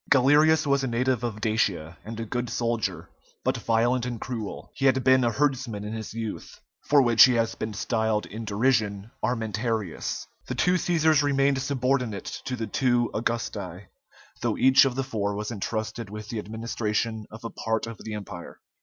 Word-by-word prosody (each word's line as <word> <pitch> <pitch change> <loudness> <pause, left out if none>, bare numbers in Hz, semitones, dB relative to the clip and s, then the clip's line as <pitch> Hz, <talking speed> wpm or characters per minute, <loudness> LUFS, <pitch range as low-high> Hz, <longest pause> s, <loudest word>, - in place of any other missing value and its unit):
Galerius 150 +3 +5
was 140 -1 +2
a - - 0
native 125 0 0
of 115 -3 -3
Dacia, 100 -7 0
and 115 +1 -7
a 115 - -3
good 120 +2 -3
soldier, 115 -2 -2 0.4
but - - +1
violent 120 +2 +1
and 120 -2 -3
cruel; 115 -4 -6
he 135 - +1
had 130 -1 +3
been 130 0 +5
a 120 - +3
herdsman 130 -4 -1
in 105 +1 -5
his 110 -1 -5
youth, 115 -1 -6 0.3
for 145 -2 +6
which 120 -2 +8
he 125 - +3
has 115 -1 +1
been 110 -1 -5
styled, 110 -1 0
in 110 +3 -7
derision, 105 -1 0
Armentarius. 110 -4 -2 0.2
The 130 - -3
two 180 +9 +3
Cæsars 160 -4 +3
remained 140 -1 +2
subordinate 125 -6 -1
to 130 - -2
the 115 -2 -3
two 120 +2 +1
Augusti, 105 -5 -3 0.5
though - - 0
each 130 +1 +6
of 130 -2 0
the 135 - 0
four 105 -6 -2
was 105 +2 -4
entrusted 110 +1 -3
with 105 +1 -8
the 115 -3 -3
administration 110 0 -2
of 110 +2 -11
a 115 - -5
part 110 -1 -1
of 115 -2 -8
the 110 -1 -5
Empire. 95 -4 -8
115 Hz, 180 wpm, -26 LUFS, 110-130 Hz, 0.5 s, which